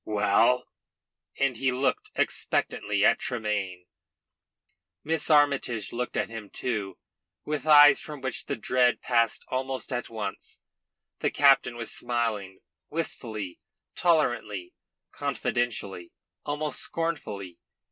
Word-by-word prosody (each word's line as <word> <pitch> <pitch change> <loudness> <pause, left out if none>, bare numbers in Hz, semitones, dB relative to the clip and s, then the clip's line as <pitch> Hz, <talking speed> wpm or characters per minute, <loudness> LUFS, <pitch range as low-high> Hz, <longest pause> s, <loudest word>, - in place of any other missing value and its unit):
Well?" 110 +4 +2 0.7
And 135 -3 +1
he 130 +1 +1
looked 130 +2 -1
expectantly 105 0 0
at - - +4
Tremayne. 105 -7 -2 1.2
Miss 160 +1 0
Armytage 140 -8 +2
looked 125 0 -3
at - - 0
him 115 -3 -8
too, 105 -6 -3 0.5
with 150 0 -3
eyes 145 -1 +8
from 150 -2 -8
which 130 -1 -3
the - - -1
dread 125 +2 +2
passed 115 -3 +1
almost 130 0 -3
at 125 - -3
once. 105 -3 -6 0.6
The - - +1
captain 135 -4 +4
was 115 -1 -3
smiling, 110 -6 -2 0.3
wistfully, 110 - -4 0.3
tolerantly, 120 - 0 0.4
confidently, 120 -10 -2 0.4
almost 145 -1 -1
scornfully. 105 - -2
120 Hz, 105 wpm, -27 LUFS, 105-140 Hz, 1.2 s, eyes